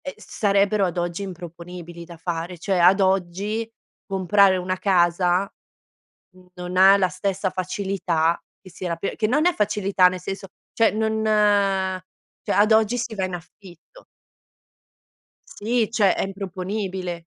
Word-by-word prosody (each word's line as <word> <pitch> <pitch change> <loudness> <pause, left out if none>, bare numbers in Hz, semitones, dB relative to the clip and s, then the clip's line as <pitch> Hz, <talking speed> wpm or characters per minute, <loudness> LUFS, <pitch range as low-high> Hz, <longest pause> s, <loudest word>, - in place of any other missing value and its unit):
E, 280 - -6
sarebbero, 200 0 +1
ad 180 -1 -4
oggi 175 +1 -2
improponibili 175 -2 -9
da 170 0 -12
fare. 170 +1 -4
Cioè, 190 +3 -1
ad 180 +3 +5
oggi, 195 +4 -1 0.4
comprare 195 0 +3
1 185 +1 -2
casa, 180 0 +2 1.0
non 180 0 -6
ha 190 +1 +7
la 190 -2 +2
stessa 190 +1 -2
facilità 180 -3 -1 0.2
che 185 - -14
si 185 - -9
era 170 -2 -2
per 165 - -4
che 215 - +1
non 285 +8 +1
è 355 - +4
facilità, 200 -4 +2
nel 180 0 -5
senso 195 +1 -6 0.3
cioè, 225 -1 +3
non 220 0 -1 1.2
cioè, - - -2
ad 215 +2 +4
oggi 220 +2 +3
si 230 -2 -4
va 195 -3 -2
in 185 -1 -4
affitto. 175 - -13 1.4
Sì, 225 +1 -1
cioè, 210 -5 +3
è - - -1
improponibile. 190 -2 -5
190 Hz, 140 wpm, -23 LUFS, 180-205 Hz, 1.4 s, ha